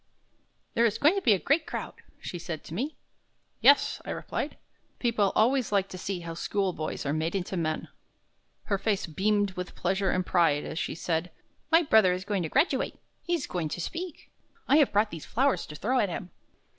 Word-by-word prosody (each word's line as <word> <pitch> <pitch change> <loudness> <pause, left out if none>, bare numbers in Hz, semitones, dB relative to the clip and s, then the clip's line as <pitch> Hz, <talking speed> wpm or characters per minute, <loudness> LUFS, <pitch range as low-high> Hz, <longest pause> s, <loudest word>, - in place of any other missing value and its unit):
"There 235 0 +4
is 210 - -2
going 300 +4 +5
to 395 - -1
be 230 - +5
a - - +3
great 295 - +1
crowd," - - -4 0.3
she 175 - -6
said 160 -2 -5
to - - -9
me. 270 - -2 0.6
"Yes," 285 - +5
I - - -9
replied; - - -4 0.4
"people 225 -5 +1
always 250 +1 +3
like 195 -1 +2
to 185 - -7
see 185 -1 -3
how 165 -1 -6
schoolboys 180 -3 -2
are 145 - 0
made 160 +4 -1
into 190 0 -2
men." 155 -3 -1 0.8
Her 200 -2 -1
face 205 -1 0
beamed 205 +4 +1
with 180 -1 -6
pleasure 190 +1 0
and 185 0 0
pride 165 -6 +3
as 160 - -4
she - - -2
said: 165 +1 -1 0.4
"My 330 +2 +6
brother 220 - +5
is 185 +1 -4
going 205 -2 0
to 160 - -2
graduate; 285 - +1 0.2
he's 345 -2 -1
going 170 -4 -3
to 175 - -4
speak. 335 - -6 0.4
I 285 - +5
have 295 -4 +4
brought 210 +1 +2
these 165 -3 -7
flowers 270 +4 +1
to 150 - -9
throw 250 - +1
at 205 - +2
him." 175 0 -6
195 Hz, 195 wpm, -28 LUFS, 175-240 Hz, 0.8 s, My